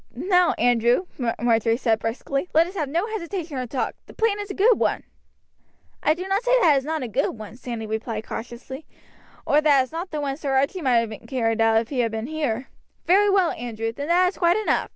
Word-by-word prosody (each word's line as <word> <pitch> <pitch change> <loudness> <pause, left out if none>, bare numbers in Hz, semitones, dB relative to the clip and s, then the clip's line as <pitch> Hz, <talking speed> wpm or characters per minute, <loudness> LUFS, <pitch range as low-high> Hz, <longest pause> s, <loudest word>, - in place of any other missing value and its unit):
"Now, 360 +5 +3
Andrew," 240 +7 +2 0.3
Marjory 230 -1 +2
said 225 -3 +1
briskly, 275 +8 -3
"let 325 +1 +6
us 360 - -8
have 305 -8 -3
no 340 +7 0
hesitation 350 -8 -5
or 250 - -4
talk, 255 +2 -2
the - - -14
plan 445 -2 +1
is 410 0 -5
a 390 - -5
good 435 +3 +4
one." - - 0 1.0
"I 305 - +3
do 365 +2 -6
not 390 +2 +1
say - - +3
that 335 -9 +5
it - - +3
is 265 - -11
not 315 -2 -2
a - - -3
good 235 +2 -1
one," 215 +1 -9
Sandy 235 -3 -6
replied 220 0 -4
cautiously, 250 +5 -8 0.6
"or 295 - +3
that 290 -3 +5
it - - +1
is 255 - -11
not 340 +3 -5
one 295 -3 -2
that 275 - -10
Sir 275 -3 -1
Archie 280 +8 +1
might 240 -5 +2
have 220 - -8
carried 225 -4 0
out 225 0 +4
if 230 - -9
he 270 - -3
had 230 -2 +1
been 220 0 -4
here." 270 -4 -3 0.4
"Very 405 +3 +4
well, 385 -4 +3
Andrew, 225 -1 -4
then 285 +4 -5
that 360 +2 +4
is 380 - -12
quite 345 +1 +3
enough. 435 - 0
275 Hz, 235 wpm, -23 LUFS, 235-355 Hz, 1.0 s, let